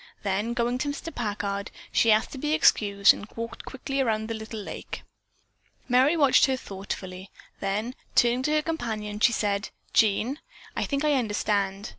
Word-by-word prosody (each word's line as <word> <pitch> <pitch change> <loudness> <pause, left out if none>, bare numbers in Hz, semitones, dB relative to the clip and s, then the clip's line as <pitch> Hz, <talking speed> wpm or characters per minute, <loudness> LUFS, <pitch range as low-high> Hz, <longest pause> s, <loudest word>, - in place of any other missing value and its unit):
Then 205 +4 -1
going 240 +1 0
to 290 - -1
Mr. 325 +3 -5
Packard, 205 -3 -3 0.2
she 230 - +4
asked 215 +1 +3
to 270 - -7
be 300 +3 0
excused 200 -10 +5
and 205 - -9
walked 230 0 -6
quickly 270 +1 -3
around 220 -3 0
the - - -1
little 220 0 -6
lake. 205 - -7 0.8
Merry 265 +6 +4
watched 280 -2 +5
her 265 -1 0
thoughtfully, 190 -3 -7 0.3
then 210 +5 -2 0.2
turning 240 +1 +4
to 300 - 0
her 305 0 +2
companion, 220 -10 -3
she 240 - +5
said, 205 -3 -1 0.2
"Jean, 225 +6 +2 0.4
I - - 0
think 280 +1 -1
I 300 - +3
understand. 205 -4 0
225 Hz, 165 wpm, -26 LUFS, 205-260 Hz, 0.8 s, excused